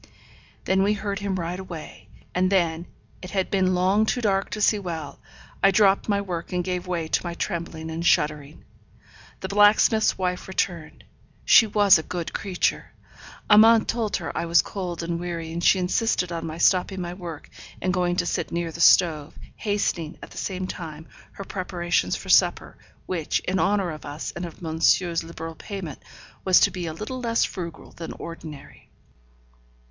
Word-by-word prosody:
Then 190 0 +2
we 205 +2 +3
heard 200 -1 -3
him 200 -1 -2
ride 175 0 -3
away; 175 -5 -9 0.3
and 185 +1 +1
then, 170 -3 +1 0.3
it 180 - -8
had 190 -2 -1
been 185 -2 +2
long 195 +4 +2
too 245 - 0
dark 195 -4 0
to 215 - -5
see 210 0 +3
well, 165 -6 -6 0.4
I 195 - +6
dropped 195 +1 +3
my 200 -1 +2
work, 175 -4 -5
and 180 -1 -1
gave 180 0 -3
way 170 -3 -2
to - - 0
my 170 -1 -4
trembling 165 -3 -4
and 165 +1 -4
shuddering. 150 -2 0 0.8
The 190 - -3
blacksmith's 205 +2 +4
wife 180 -1 -2
returned. 175 -4 -3 0.4
She 225 - +7
was 205 -4 +5
a - - -2
good 170 -1 -5
creature. 190 -3 -2 0.5
Amante 220 +1 +7
told 225 -3 -1
her - - -6
I 170 - -2
was 170 0 +4
cold 180 -4 -5
and 170 0 -2
weary, 170 -2 -5
and 170 +1 -4
she 190 - +5
insisted 180 0 0
on 165 -1 -4
my 160 0 -6
stopping 185 +2 +2
my 175 -1 -4
work, 170 -4 -8 0.3
and 185 - -1
going 175 -1 +1
to 180 - 0
sit - - -2
near 170 -1 -2
the 170 - -6
stove; 160 -4 +4 0.2
hastening, 195 -6 -2
at - - -10
the - - -12
same 185 -1 -3
time, 160 -3 -7 0.3
her 195 - -7
preparations 175 - -1
for - - -8
supper, - - +3 0.3
which, 165 -5 -1
in 190 +1 -1
honour 195 -2 +1
of 155 - -9
us, 145 +2 -6
and 175 0 -4
of 170 - -13
monsieur's 165 +1 +2
liberal 165 0 -7
payment, 180 -5 -7 0.4
was 185 -1 +6
to - - +4
be 180 -2 -5
a - - -3
little 215 +10 -6
less 230 -1 +1
frugal 170 -3 -7
than 165 - -7
ordinary. 160 -3 -10
180 Hz, 180 wpm, -24 LUFS, 165-195 Hz, 0.8 s, She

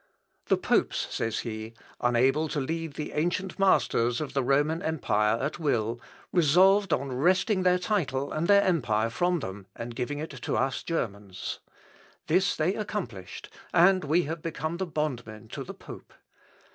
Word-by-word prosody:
"The - - +3
popes," - - +1
says 115 -1 -1
he, 110 -1 -6 0.2
"unable 130 +6 +2
to 150 - -2
lead 160 +2 -3
the 150 - -4
ancient 175 +5 -1
masters 120 -11 +3
of 150 - -4
the 135 - +1
Roman 145 +5 +2
empire 110 - +1
at 150 +5 -3
will, 120 -6 0 0.3
resolved 190 +5 +5
on 135 -1 0
wresting 185 - +2
their 180 0 +4
title 150 -9 -1
and 160 +2 -1
their 200 0 +6
empire 115 - +1
from 175 +5 +1
them 95 -1 -7
and 115 0 -6
giving 135 +5 -3
it 155 +2 -5
to 135 -4 -3
us 135 -3 0
Germans. 100 - -4 0.7
This 185 +5 +2
they 160 +5 +1
accomplished, 180 - -5 0.3
and 185 +2 +5
we 160 +4 +2
have 160 +1 -4
become 160 0 -3
bondmen 130 - -4
to - - -5
the - - -9
pope. - - -12
150 Hz, 155 wpm, -28 LUFS, 120-175 Hz, 0.7 s, their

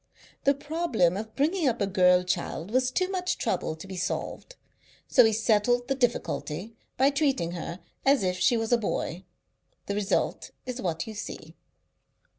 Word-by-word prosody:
The 280 0 +5
problem 285 - +1
of 215 +2 -6
bringing 315 +3 +1
up 240 -2 +1
a 200 - +2
girl 180 -2 +4
child 180 0 -3
was 255 +1 +2
too 370 +8 0
much 365 -1 -1
trouble 155 - -1
to 160 - -10
be 190 - -7
solved, 180 - -4 0.5
so 250 - +6
he 220 - +4
settled 225 +2 +2
the - - +3
difficulty 230 - -2 0.2
by 270 +2 +4
treating 275 - +1
her 175 0 -6 0.2
as 275 -4 +4
if 180 0 0
she 245 - +4
was 225 0 -2
a 240 - +4
boy. 190 -4 -3 0.6
The 200 - -2
result 205 -1 -1 0.2
is 255 0 -4
what 170 -2 -2
you 220 - -7
see." 205 - -7
225 Hz, 170 wpm, -27 LUFS, 185-270 Hz, 0.6 s, so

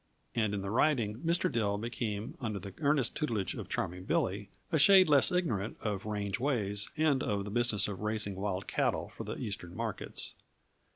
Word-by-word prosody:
And 110 -3 +1
in 100 - -3
the 100 - -3
riding, 115 -4 +2
Mr. 170 +4 +1
Dill 105 -4 +1
became 110 -1 -3
under 110 -4 -2
the 100 0 -7
earnest 145 -4 +2
tutelage 115 -10 -1
of - - -7
Charming 90 +2 -3
Billy 100 +2 0 0.2
a 160 - +3
shade 190 +3 +8
less 145 -3 +6
ignorant 120 - 0
of 105 -1 -3
range 100 -2 -2
ways 105 -7 0
and 150 -4 +3
of 100 -1 -1
the 105 - -5
business 110 -3 +2
of 100 -2 -5
"raising 105 -1 -1
wild 95 -1 -2
cattle - - 0
for - - -8
the - - -4
Eastern 90 -4 -5
markets." 115 -2 -4
105 Hz, 180 wpm, -32 LUFS, 100-130 Hz, 0.2 s, shade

